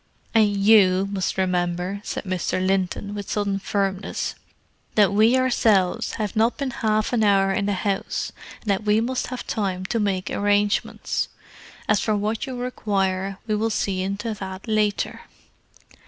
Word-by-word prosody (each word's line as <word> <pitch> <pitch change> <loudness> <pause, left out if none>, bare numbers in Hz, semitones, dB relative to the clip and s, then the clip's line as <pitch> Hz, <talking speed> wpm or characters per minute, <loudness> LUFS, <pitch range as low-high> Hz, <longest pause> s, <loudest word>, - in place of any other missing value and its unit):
"And 215 -2 +5
you 195 -2 +5
must 190 -1 -2
remember," 180 +1 -1
said - - -4
Mr. 185 -1 -1
Linton, 190 +2 -1
with 205 -1 -6
sudden 200 -2 0
firmness, 195 0 -2 0.6
"that 205 -2 +4
we 220 +5 +5
ourselves 220 -8 +2
have 210 -3 -3
not 225 +2 +2
been 275 -3 -2
half 215 -1 0
an 225 -2 +2
hour 195 -1 +4
in 200 0 0
the 205 - +1
house, 195 +1 -2 0.3
and 210 - -1
that 195 +1 0
we 210 +1 +3
must 250 +3 -1
have 250 -1 -6
time 190 -3 -2
to 230 +4 -1
make 195 -3 -1
arrangements. 205 0 0 0.6
As 210 -1 +3
for 215 - +1
what 215 +5 -2
you 260 - -5
require, 195 -6 -1
we 215 - -1
will 220 +2 +1
see 195 -3 -1
into 200 +4 -2
that 190 0 -7
later." 215 -2 0
205 Hz, 155 wpm, -23 LUFS, 190-215 Hz, 0.6 s, And